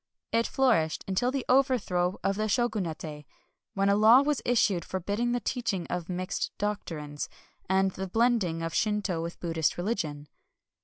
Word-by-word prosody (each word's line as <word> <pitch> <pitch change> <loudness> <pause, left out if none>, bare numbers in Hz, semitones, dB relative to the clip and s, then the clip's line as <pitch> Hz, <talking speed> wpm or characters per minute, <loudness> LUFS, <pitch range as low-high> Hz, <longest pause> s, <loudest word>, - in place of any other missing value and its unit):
It 230 0 +2
flourished 225 -13 +1
until 195 +6 +1
the 265 0 -2
overthrow 225 -9 +2
of 195 - +1
the 215 +1 -1
Shogunate, 175 - -2 0.5
when 195 0 +2
a 200 - +4
law 220 +5 +7
was 295 -2 0
issued 210 -7 +2
forbidding 205 +7 -2
the 245 - +1
teaching 225 -6 -2
of 175 -1 -3
mixed 185 +1 -2
doctrines, 160 -8 -4 0.4
and 190 0 +3
the 190 +1 -5
blending 205 -6 +1
of 165 0 -3
Shinto 210 -4 0
with 170 +1 -6
Buddhist 165 -3 0
religion. 165 -7 -3
195 Hz, 150 wpm, -28 LUFS, 170-230 Hz, 0.5 s, law